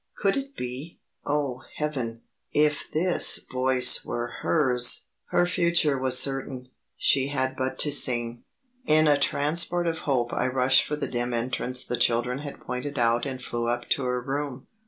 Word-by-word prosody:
Could 195 -1 +1
it 275 0 -5
be 125 +6 -7 0.3
oh, 140 -3 -2
heaven! 130 -7 -4 0.3
if 150 0 0
this 175 +3 +3
voice 130 0 +3
were 120 0 -4
hers! 125 -6 +2 0.2
Her 175 - +1
future 170 -4 +2
was 130 -1 +2
certain; 135 -2 0 0.3
she 135 -1 +2
had 130 -2 -2
but 130 0 -3
to 150 - +2
sing. 120 -4 +2 0.4
In 155 0 +4
a 145 -1 +3
transport 170 +5 +1
of 165 -1 -2
hope 120 -3 0
I - - 0
rushed 130 0 +3
for 150 - -2
the 150 - -4
dim 120 0 -3
entrance 125 +1 0
the 125 - -3
children 120 +2 +1
had 145 -1 -9
pointed 140 +3 -5
out 120 +2 +1
and 130 -1 -5
flew 120 -1 -4
up 120 0 -3
to 140 - +1
her 125 0 -1
room. 140 -1 -5
130 Hz, 165 wpm, -25 LUFS, 125-150 Hz, 0.4 s, In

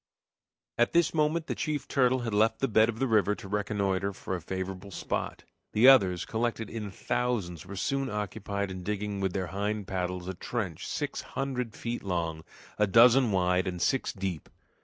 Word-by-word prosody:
At 120 - +3
this 170 -1 +3
moment 155 +1 +1
the - - -2
chief 150 -2 -3
turtle 130 -2 +2
had 115 -3 -3
left 110 +2 +3
the 135 - 0
bed 110 0 +4
of 115 - -3
the 135 - +1
river 105 -4 +3
to 100 - -10
reconnoiter 100 -1 -1
for 95 - -4
a 90 - -5
favorable 95 +2 -5
spot; 95 - -4 0.3
the 115 +4 +6
others, 95 -10 +6
collected 115 -1 -2
in 105 -3 -4
thousands, 100 -6 -2
were 100 - -7
soon 135 +7 -1
after 105 - -5
occupied 100 -1 -3
in 95 -1 -6
digging 105 +1 -3
with 95 -2 0
their 95 -1 -1
hind 105 +1 -2
paddles 90 -1 -3
a 95 - -3
trench 95 -3 -4
six - - -3
hundred 125 -4 -3
feet 120 +1 -4
long, 85 -4 -2 0.4
a 105 - +4
dozen 120 +3 +6
wide, 90 -1 +2
and 90 -1 -3
six 135 +8 +1
deep. 95 -5 -4
105 Hz, 185 wpm, -29 LUFS, 95-120 Hz, 0.4 s, the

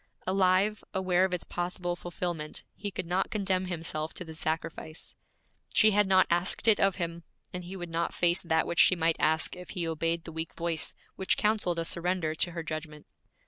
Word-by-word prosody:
Alive, 190 +2 +2
aware 185 -1 +3
of 190 - -3
its 175 - -4
possible 175 0 -3
fulfillment, 175 -3 -4
he 205 0 -4
could 185 - -4
not 180 +3 0
condemn 190 -3 0
himself 160 -3 -3
to 180 - -6
the 160 - -8
sacrifice. 160 0 -4 0.6
She 215 -1 +6
had 210 0 +3
not 190 0 +5
asked 175 +6 +2
it 220 - +7
of 195 -1 +4
him, 170 -2 -3 0.3
and 180 -1 -5
he 185 +2 -7
would 175 -2 -5
not 170 +1 -1
face 175 +1 +2
that 160 -2 +1
which 170 - -2
she 185 - +7
might 165 -1 +2
ask 160 +3 +2
if 180 0 -10
he 170 -2 -1
obeyed 165 +1 -1
the 165 - -8
weak 160 0 -5
voice 165 -1 -1 0.2
which 190 - +1
counseled 210 -5 +1
a 165 - -1
surrender 170 -2 -1
to 175 +2 +1
her 170 -1 -4
judgment. 155 -1 -6
175 Hz, 195 wpm, -29 LUFS, 165-185 Hz, 0.6 s, it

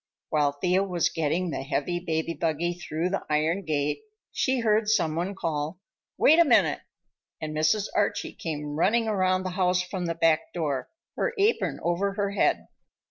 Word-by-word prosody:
While 145 -2 +2
Thea 180 +6 +1
was 180 -4 0
getting 165 +3 -1
the - - -3
heavy 150 +5 -2
baby 165 -1 -2
buggy 165 +1 -1
through 175 0 -3
the 195 - -1
iron 155 +5 +1
gate 150 - -1 0.3
she 260 -2 0
heard 215 -1 +2
some 175 -8 +2
one 180 +4 -2
call, 160 -1 -3 0.4
"Wait 320 +3 +6
a - - +9
minute!" 310 - +3 0.6
and 155 -1 -5
Mrs. 155 +7 +2
Archie 205 -1 0
came 150 -3 -5
running 225 +6 +3
around 185 -3 +1
the 185 - -3
house 180 -1 +1
from 180 -1 -4
the 165 - -2
back 165 -1 +2
door, 145 -6 -2 0.3
her 485 - -1
apron 415 +3 +1
over 185 +4 0
her 200 -1 -1
head. 200 - +1
175 Hz, 170 wpm, -26 LUFS, 155-195 Hz, 0.6 s, a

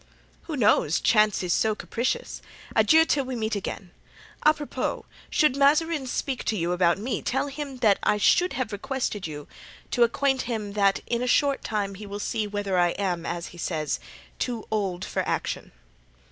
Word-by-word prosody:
"Who 315 -4 -4
knows? 205 - +3
Chance 215 -3 +3
is 175 -1 +1
so 220 -1 +2
capricious. 255 - -3 0.3
Adieu, 320 0 +6
till 285 -3 +1
we 260 0 -4
meet 220 -1 -1
again! 190 -2 -5 0.5
Apropos, 300 -1 0 0.2
should 305 -6 +3
Mazarin 295 +1 +3
speak 260 +1 -2
to 220 - 0
you 170 0 -1
about 175 -1 +3
me, 235 +6 -3
tell 270 +3 -1
him 280 -1 -6
that 200 -2 +5
I 210 - +2
should 360 - +3
have 255 -4 -2
requested 220 - -3
you 150 -2 -8 0.4
to 245 - 0
acquaint 265 +3 +3
him 210 -4 -3
that 200 -1 +2
in 235 0 -1
a 250 - -1
short 280 +2 +2
time 205 -2 -2
he 205 +2 -9
will 200 0 -5
see 210 +1 -2
whether 205 -2 -1
I 175 -1 +3
am, 180 -4 -1
as 170 0 -4
he 175 - -13
says, 155 -3 -2 0.4
too 240 -3 -2
old 190 -4 -1
for - - -1
action." - - -3
220 Hz, 175 wpm, -26 LUFS, 195-270 Hz, 0.5 s, Adieu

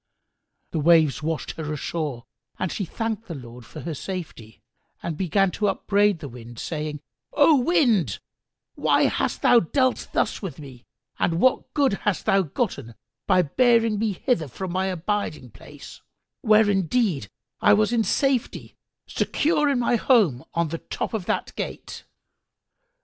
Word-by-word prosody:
The 160 - -1
waves 155 -2 +4
washed 160 0 -3
her 155 -2 -4
ashore, 150 -4 -4 0.3
and 185 - -2
she 200 - -3
thanked 225 +4 -4
the 170 - -6
Lord 125 -2 -11
for 160 +1 -6
safety 145 - -7 0.4
and 170 -2 -3
began 190 +3 +1
to 210 +4 -1
upbraid 200 0 +2
the 145 - -5
Wind, 120 -2 -11
saying, 150 0 -4 0.3
"O 290 0 +5
Wind, 240 - +2 0.6
why - - +2
hast - - -1
thou 240 - +7
dealt 255 - 0
thus - - 0
with 195 -5 -6
me 130 -5 -12 0.3
and 165 -1 +1
what 260 +5 +2
good 280 -6 +3
hast 205 -4 -1
thou 195 - +4
gotten 140 - -3 0.3
by 180 - +4
bearing 230 - +2
me 220 -2 0
hither 180 - -1
from 185 +8 -6
my 185 +1 0
abiding 180 - -3
place, 140 +7 -13 0.4
where 215 -2 +5
indeed 195 - 0 0.3
I 205 - +6
was 215 +2 +2
in 230 -2 +2
safety, 265 +4 -1 0.3
secure 300 -1 +1
in 275 - +1
my 240 0 +2
home 205 - +3
on 170 -1 +1
the 165 - -4
top - - -5
of 205 -5 -3
that - - -2
gate?" - - -6
185 Hz, 150 wpm, -24 LUFS, 150-225 Hz, 0.6 s, thou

